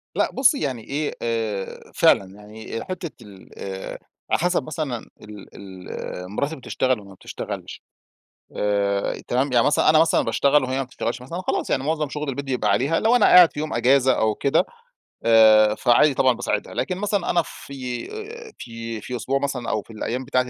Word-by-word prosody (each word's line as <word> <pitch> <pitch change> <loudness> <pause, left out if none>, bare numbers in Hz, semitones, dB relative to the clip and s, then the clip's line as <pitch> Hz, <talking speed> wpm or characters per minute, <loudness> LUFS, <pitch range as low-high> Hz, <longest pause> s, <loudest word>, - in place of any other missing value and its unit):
لا - - +1
بُصّي 270 +2 +3
يعني 125 -5 -3
إيه، 145 +2 -3
آآ 110 -4 -3
فعلًا، 100 - +4
يعني 110 +2 -8
حتّة 175 -3 -5
ال 100 -3 -14 0.8
على - - +3
حسب 175 -2 +1
مثلًا 140 -5 -5
ال 105 -2 -11
ال 90 -1 -8
مراتي 140 +9 -2
بتشتغل 130 -2 -2
والّا 100 -1 -14
ما - - -12
بتشتغلش؟ - - -7 0.7
آآ، 100 -1 0
تمام، 130 +2 0
يعني 120 -2 +4
مثلًا 145 - +3
أنا 155 0 +6
مثلًا 165 - +4
باشتغل 140 +5 +2
وهي 130 +1 -2
ما 135 - 0
بتشتغلش 125 -1 -4
مثلًا، 165 +8 -6
خلاص، - - -2
يعني - - 0
معظم 155 -1 -1
شغل 150 -1 -4
البيت 140 +1 -4
بيبقى 125 -5 -1
عليها. 135 +10 +1
لو 225 +2 +3
أنا 245 - +5
قاعد 180 -2 +7
في 145 - -6
يوم 155 0 -3
أجازة 130 0 +4
أو 110 -3 +1
كده، 140 - +2 0.6
آآ 110 -2 +6
فعادي 130 +5 +4
طبعًا 130 -1 +3
باساعدها. 110 -3 -3
لكن 185 -1 -2
مثلًا، 205 -2 -1
أنا 170 - +3
في 125 -3 -7 0.5
في 115 -1 -7
في 125 - -6
أسبوع 130 +4 -1
مثلًا 135 -4 -3
أو 110 - 0
في 115 - -15
الأيّام 125 +4 -4
بتاعتي 125 -1 0
125 Hz, 180 wpm, -23 LUFS, 110-150 Hz, 0.8 s, قاعد